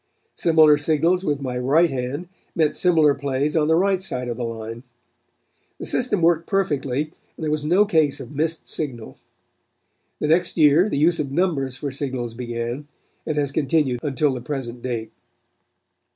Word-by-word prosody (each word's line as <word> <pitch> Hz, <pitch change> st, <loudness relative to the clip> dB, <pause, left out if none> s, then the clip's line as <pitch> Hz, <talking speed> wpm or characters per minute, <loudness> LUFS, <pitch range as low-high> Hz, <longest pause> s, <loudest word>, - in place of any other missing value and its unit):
Similar 155 Hz, -3 st, +5 dB
signals 165 Hz, +5 st, +2 dB
with 145 Hz, -5 st, -1 dB
my 125 Hz, -2 st, -3 dB
right 155 Hz, +7 st, +3 dB
hand 135 Hz, +6 st, -4 dB, 0.3 s
meant 155 Hz, -3 st, +2 dB
similar 160 Hz, -5 st, +4 dB
plays 140 Hz, +2 st, -2 dB
on 155 Hz, -2 st, +2 dB
the 160 Hz, -, +4 dB
right 190 Hz, +1 st, +2 dB
side 125 Hz, -9 st, -3 dB
of 120 Hz, -, -3 dB
the 125 Hz, -, -3 dB
line. 115 Hz, 0 st, -6 dB, 1.0 s
The -, -, -7 dB
system 225 Hz, -8 st, 0 dB
worked 165 Hz, 0 st, +3 dB
perfectly 150 Hz, -6 st, -1 dB, 0.3 s
and -, -, -7 dB
there 155 Hz, -, -1 dB
was 155 Hz, -1 st, -1 dB
no 180 Hz, +7 st, +4 dB
case 160 Hz, -8 st, +2 dB
of -, -, -9 dB
missed 160 Hz, +3 st, -2 dB
signal. 130 Hz, -8 st, -5 dB, 1.0 s
The -, -, -1 dB
next 175 Hz, +4 st, +2 dB
year 155 Hz, +5 st, +5 dB
the 140 Hz, -, -1 dB
use 165 Hz, +4 st, +3 dB
of 140 Hz, -3 st, -2 dB
numbers 140 Hz, -6 st, 0 dB
for 140 Hz, +1 st, -4 dB
signals 130 Hz, -4 st, -4 dB
began, 120 Hz, +3 st, -5 dB, 0.4 s
and 155 Hz, -2 st, -2 dB
has 140 Hz, -2 st, 0 dB
continued 140 Hz, -3 st, +1 dB
until 145 Hz, 0 st, 0 dB
the 125 Hz, -, -5 dB
present 125 Hz, -3 st, -5 dB
date. 115 Hz, -3 st, -4 dB
145 Hz, 165 wpm, -22 LUFS, 130-165 Hz, 1.0 s, Similar